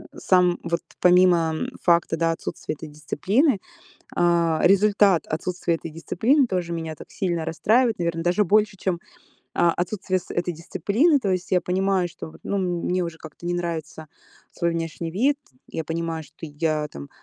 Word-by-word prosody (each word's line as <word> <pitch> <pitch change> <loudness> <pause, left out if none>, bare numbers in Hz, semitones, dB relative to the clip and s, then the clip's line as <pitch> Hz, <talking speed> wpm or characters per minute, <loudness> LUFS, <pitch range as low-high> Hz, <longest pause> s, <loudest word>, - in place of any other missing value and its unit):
сам 180 -2 +3
вот, 170 0 -1 0.2
помимо 180 -2 +5 0.3
факта, 170 -1 +3
да, 165 0 +2
отсутствия 165 - -5
этой 155 +1 -9
дисциплины, 200 - +1 0.6
э, 170 -2 +2
результат 200 -1 +4
отсутствия 170 +1 -1
этой 165 0 -7
дисциплины 235 - +2
тоже 180 -4 -2
меня 160 -1 -4
так - - -13
сильно 170 -4 -2
расстраивает, 220 +8 +2
наверно, 170 -1 -1
даже 180 +5 +3
больше 210 +2 +3
чем, 180 -2 -1 0.6
а, 170 -1 +5
отсутствие 185 +1 -1
с - - -15
этой 175 0 -1
дисциплины. 225 - +2
То 205 -6 -1
есть 185 -1 -3
я 180 - +3
понимаю, 190 0 +1
что 165 - -9
вот, - - -16
ну, 200 - -1
мне 180 0 0
уже 170 -2 -4
как-то 155 +2 -10
не 175 - 0
нравится 160 -2 -4 0.5
свой 170 - 0
внешний 165 0 -3
вид, 265 - +2 0.3
я 160 - -4
понимаю, 165 0 -3
что - - -21
я 155 0 -1
там 70 - -9
175 Hz, 165 wpm, -24 LUFS, 165-190 Hz, 0.6 s, помимо